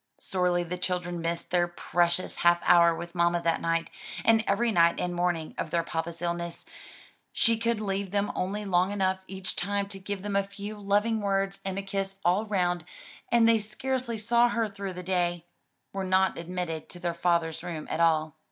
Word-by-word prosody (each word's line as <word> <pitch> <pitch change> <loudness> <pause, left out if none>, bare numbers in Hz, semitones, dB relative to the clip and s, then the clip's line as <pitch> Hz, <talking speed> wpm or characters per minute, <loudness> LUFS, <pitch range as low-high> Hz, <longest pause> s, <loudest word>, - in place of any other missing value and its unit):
Sorely 180 -2 +1
the 180 +1 -5
children 180 -1 -2
missed 170 0 -3
their 175 -1 +3
precious 175 +1 0
half 175 0 +4
hour 170 -1 +6
with 170 +1 -7
mamma 170 0 +2
that 165 -1 +1
night, 165 0 0 0.3
and 225 -1 +5
every 230 +4 +2
night 170 -3 +4
and 180 0 -1
morning 175 -2 -1
of - - -2
their 170 +1 +1
papa's 165 +1 -4
illness; 170 0 -3 0.7
she 230 - +3
could 230 0 0
leave 195 -2 -2
him 205 0 0
only 205 +3 -2
long 185 0 +2
enough 190 -2 +1
each 190 -1 -3
time 200 +2 -1
to 195 -1 -6
give 200 0 -5
them 205 -1 -3
a 200 - +4
few 200 +2 -7
loving 210 +2 +1
words 195 -1 0
and 190 0 -3
a 195 - -2
kiss 195 0 -3
all 190 +5 +2
round, 180 -4 +1 0.5
and 235 -1 +5
they 230 -1 +5
scarcely 240 +2 -3
saw 235 +3 +3
her 230 -2 0
through 195 -2 -6
the 180 0 -7
day 175 -2 0 0.5
were 195 0 -2
not 190 0 +2
admitted 170 -2 -4
to 175 - -9
their 175 -1 -1
father's 170 -2 0
room 160 -3 -5
at - - -3
all. 160 -2 +2
185 Hz, 190 wpm, -28 LUFS, 170-200 Hz, 0.7 s, hour